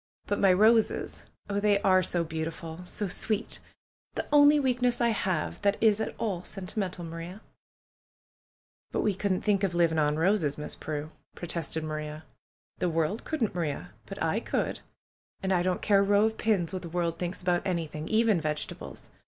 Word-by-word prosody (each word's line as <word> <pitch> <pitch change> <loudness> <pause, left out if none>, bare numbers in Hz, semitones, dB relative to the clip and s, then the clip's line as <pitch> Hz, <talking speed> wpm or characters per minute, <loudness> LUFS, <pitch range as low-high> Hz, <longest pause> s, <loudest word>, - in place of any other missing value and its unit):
"But 205 - -1
my 195 -2 +5
roses! 220 +4 +3 0.2
Oh, 200 0 -1
they 205 -1 +3
are 185 -1 +5
so 175 -1 +1
beautiful! 160 +1 -5
So 205 +3 -1
sweet! 215 +4 -1 0.6
The - - -2
only 295 0 +7
weakness 250 -2 +1
I 235 -1 +3
have 185 -7 -1
that 200 0 +2
is 220 -1 +4
at - - -3
all 200 -6 -2
sentimental, 185 -2 -4
Maria 165 +4 -7 0.8
!" - - -62
"But - - 0
we 210 - +2
couldn't 195 -1 -1
think 205 -2 +1
of 185 -3 0
living 165 -2 +3
on 150 0 +2
roses. 165 -4 +2
Miss 150 - -4
Prue!" 155 0 -5 0.2
protested 165 -2 -3
Maria. 155 0 -5 0.6
"The 180 - +1
world 165 +6 -1
couldn't, 275 -9 -1
Maria. 165 -5 -3 0.2
But - - -5
I - - +1
could. - - -2 0.6
And 190 0 +1
I 175 - +3
don't 180 0 -1
care 200 -2 +5
a - - +5
row 205 +1 +4
of 220 0 -1
pins 195 -6 +1
what 185 - -3
the 170 - -7
world 170 -1 -1
thinks 180 +1 -3
about 175 -1 +2
anything, 160 -4 -3
even 220 -5 +3
vegetables. 150 -1 -5
185 Hz, 175 wpm, -28 LUFS, 165-210 Hz, 0.8 s, only